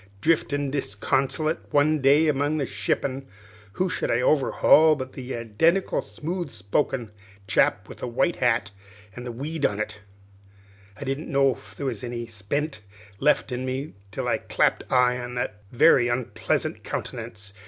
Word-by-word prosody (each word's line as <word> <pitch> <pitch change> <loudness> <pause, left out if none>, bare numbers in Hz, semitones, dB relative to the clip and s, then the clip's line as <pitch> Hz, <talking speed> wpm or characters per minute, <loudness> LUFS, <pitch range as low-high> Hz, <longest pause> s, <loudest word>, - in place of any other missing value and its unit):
"Driftin' 145 -1 +1
disconsolate 140 +5 0
one 150 +1 +3
day 145 +4 +5
among 145 +1 +1
the 140 - 0
shippin', 130 +7 -2 0.5
who 185 - 0
should - - -2
I 120 - +2
overhaul 155 +3 +5
but 130 -2 -6
the 130 0 -5
identical 120 - +1
smooth 170 +1 -5
spoken 110 +3 -1 0.3
chap - - +2
with - - -11
a - - -2
white 170 +9 +1
hat 115 -5 +1 0.4
an' 125 0 -7
a - - -3
weed 145 +6 -5
on 105 -4 +1
it! 110 0 -3 1.0
I - - -6
didn't 135 +3 -3
know 135 -1 +4
if - - -15
there 140 - -5
was 120 -5 -3
any 120 -1 -4
spent 115 +6 -3 0.4
left 150 -1 +2
in 125 +1 -3
me, 130 +3 -3 0.2
till - - -4
I - - +1
clapped - - 0
eye 125 -1 +4
on 125 0 -6
his 120 - 0 0.2
very 120 0 +5
onpleasant 120 0 -1
countenance. 105 -1 -6
135 Hz, 155 wpm, -25 LUFS, 120-150 Hz, 1.0 s, day